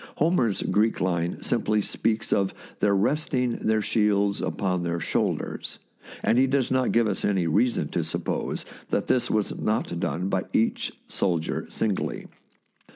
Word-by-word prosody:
Homer's 145 - +2
Greek 110 +2 +2
line 85 -2 -1
simply 105 0 +1
speaks 110 +1 0
of 95 -1 +1 0.2
their 100 -1 +3
resting 125 +2 +1
their 110 -1 +1
shields 100 -2 +2
upon 90 -2 -1
their 85 0 -1
shoulders, 80 - -2 0.5
and 120 - +3
he 135 - +5
does 135 -2 +1
not 130 -1 +2
give 115 0 +3
us 105 -3 -2
any 95 -4 +2
reason 110 +10 +2
to 85 - -1
suppose 80 - -3 0.2
that - - 0
this 125 - +1
was 105 -2 0
not 105 -5 -1
done 90 +2 -1
by 95 -1 0
each 115 - +1 0.2
soldier 85 -4 -1
singly. 105 -4 -2
105 Hz, 150 wpm, -26 LUFS, 95-115 Hz, 0.5 s, he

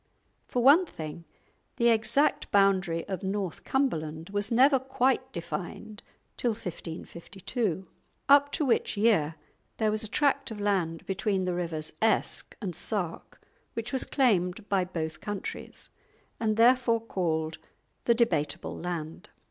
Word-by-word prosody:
For 245 - 0
one 310 +8 +7
thing, 160 - -7 0.5
the 235 0 +3
exact 230 +6 +2
boundary 190 -4 +2
of 190 -3 -3
North 195 -2 -3
Cumberland 165 - -1
was 205 +2 -2
never 265 +3 +5
quite 260 0 0
defined 170 +4 -6 0.4
till 240 -2 +1
1552; 185 +1 -5 0.4
up 285 0 +6
to 305 - +1
which 235 -4 +1
year 200 -8 +3 0.4
there 215 -1 +2
was 215 +1 -1
a - - -2
tract 280 +6 +1
of 220 -2 -7
land 185 -5 0
between 195 -1 0
the 180 - 0
rivers 165 -3 -3
Esk 220 -1 +1
and 180 -4 -3
Sark, 180 -5 -4 0.3
which 230 +3 -4
was 265 - +1
claimed 205 -6 +1
by 195 -2 +2
both 160 -3 -4
countries, 205 -2 -5 0.5
and 215 -1 0
therefore 235 0 +5
called 160 -7 -2 0.5
the 235 - +4
"Debateable 170 -11 0
Land." 165 -2 -5
205 Hz, 130 wpm, -28 LUFS, 170-235 Hz, 0.5 s, one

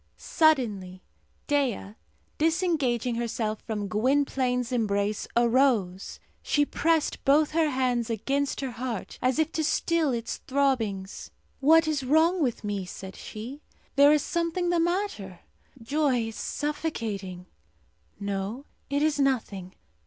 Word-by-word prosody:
Suddenly 210 - +1 0.4
Dea, 265 -9 0 0.5
disengaging 300 - +1
herself 225 -2 -2
from 210 -3 -4
Gwynplaine's 250 +1 +1
embrace, 205 -3 0
arose. 235 -6 +2 0.2
She 290 -1 +2
pressed 320 +1 0
both 295 +2 +4
her 320 -1 +2
hands 250 -3 0
against 275 +6 -1
her 265 -2 -3
heart, 240 -3 -5
as 255 0 +1
if 320 0 +1
to 315 - -1
still 325 -1 +1
its 235 -2 -3
throbbings. 230 -9 -1 0.3
"What 320 +3 +5
is 300 -3 0
wrong 320 +6 +3
with 245 -6 -1
me?" 205 -2 -2
said 190 +1 -9
she. 245 +7 -8 0.3
"There 285 +1 +7
is 300 -2 +3
something 340 +1 -1
the 345 - +2
matter. 335 - -2 0.4
Joy 250 -1 0
is 225 - -10
suffocating. 220 - -4 0.7
No, 200 +6 -4 0.2
it 285 +1 +1
is 305 -1 +1
nothing! 215 -9 -1
255 Hz, 125 wpm, -27 LUFS, 215-300 Hz, 0.7 s, There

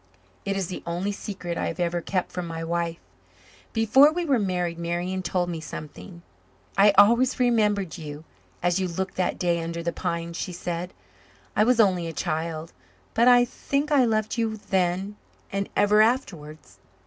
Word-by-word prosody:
It 195 0 -1
is 195 - -1
the 180 - -6
only 175 +4 -1
secret 190 -4 -5
I - - -1
have - - -5
ever 175 0 0
kept 185 +1 -2
from 180 -1 -4
my 165 0 -5
wife. 170 0 -2 0.7
Before 245 +7 +5
we 350 +2 -2
were 275 -6 +2
married 180 -4 -1
Marian 175 +2 -2
told 180 0 -1
me 170 -2 -4
something. 155 +4 -9 0.5
"I 200 +1 +6
always 235 +6 +5
remembered 210 -8 +1
you 150 -1 -8 0.4
as 175 +1 +2
you 185 - 0
looked 190 +3 -3
that 185 -1 0
day 170 -2 0
under 170 0 -4
the 170 0 -2
pines," 170 -1 -3
she 180 - -4
said. 175 0 -4 0.6
"I 210 - +4
was 240 +1 +3
only 185 -5 +3
a 165 - -5
child, 160 +1 -3 0.4
but 235 +2 +4
I 245 -1 +7
think 280 +4 -2
I 280 -3 +5
loved 220 0 0
you 220 -1 -1
then 190 +1 -1 0.3
and 195 0 -2
ever 210 +1 +5
afterwards. 175 - -2
185 Hz, 170 wpm, -25 LUFS, 170-215 Hz, 0.7 s, I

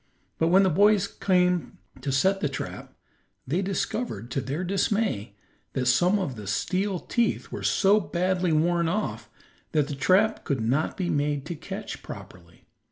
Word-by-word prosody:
But 165 - +3
when 190 +3 +5
the 190 - +3
boys 205 +3 +4
came 180 -3 +1 0.2
to 140 - -2
set 190 +9 +2
the 145 - 0
trap 135 - -7 0.5
they 165 +8 0
discovered, 190 - -3
to 135 - -1
their 145 +8 -3
dismay, 195 - 0 0.4
that 130 -2 -1
some 175 +11 +4
of 180 -10 -3
the 105 -3 -8
steel 190 - 0
teeth 235 +5 -1
were - - -5
so 205 +1 +4
badly 180 +1 0
worn 170 +2 +2
off 210 +5 -3 0.4
that 150 -2 +2
the - - -3
trap 190 +10 +3
could 140 -4 -1
not 125 +8 0
be 180 -2 -1
made 145 -1 0
to 170 - -4
catch - - -7
properly. 85 -1 -12
175 Hz, 165 wpm, -26 LUFS, 140-195 Hz, 0.5 s, when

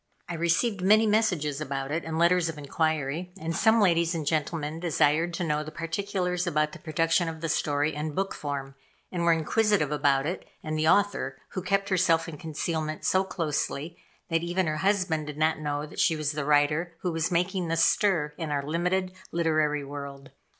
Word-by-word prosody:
I 175 - -4
received 170 +5 +1
many 215 +4 +5
messages 180 -10 +1
about 135 -1 -3
it, 160 +3 -1
and 160 0 -3
letters 170 0 +3
of 160 - -6
inquiry, 155 +3 -1
and 160 +1 -3
some 225 +4 +4
ladies 170 -4 +3
and 160 -2 -3
gentlemen 155 +1 -1
desired 165 0 +2
to 180 - -2
know 150 -2 0
the 155 - -7
particulars 180 +2 -2
about 150 -2 +1
the - - -10
production 165 +1 +1
of 160 0 -7
the 165 - -1
story 145 +1 +1
in 150 0 -4
book 195 0 -1
form; 140 -2 -5 0.4
and 175 - -2
were 170 - +4
inquisitive 165 0 +2
about 140 -2 +2
it 175 +5 -3 0.2
and 155 -1 -3
the 155 0 +1
author 200 +3 +2
who 185 - -4
kept 195 +2 0
herself 170 -3 +2
in 155 -3 -8
concealment 155 -1 -3
so 190 0 +3
closely 165 -2 -3 0.3
that 165 -1 +1
even 175 +2 0
her 155 -1 -1
husband 180 -5 +1
did 150 -1 -6
not 155 0 +2
know 145 -1 -2
that 150 - -10
she 165 - +3
was 155 -2 -1
the 150 -2 -3
writer 150 +4 +2
who 180 - -1
was 165 -1 -1
making 180 +1 0
this 165 0 +3
stir 170 -8 +2
in 160 -2 -3
our 140 -1 -1
limited 180 +4 0 0.2
literary 155 -3 +1
world. 140 -1 -8
165 Hz, 190 wpm, -27 LUFS, 150-180 Hz, 0.4 s, many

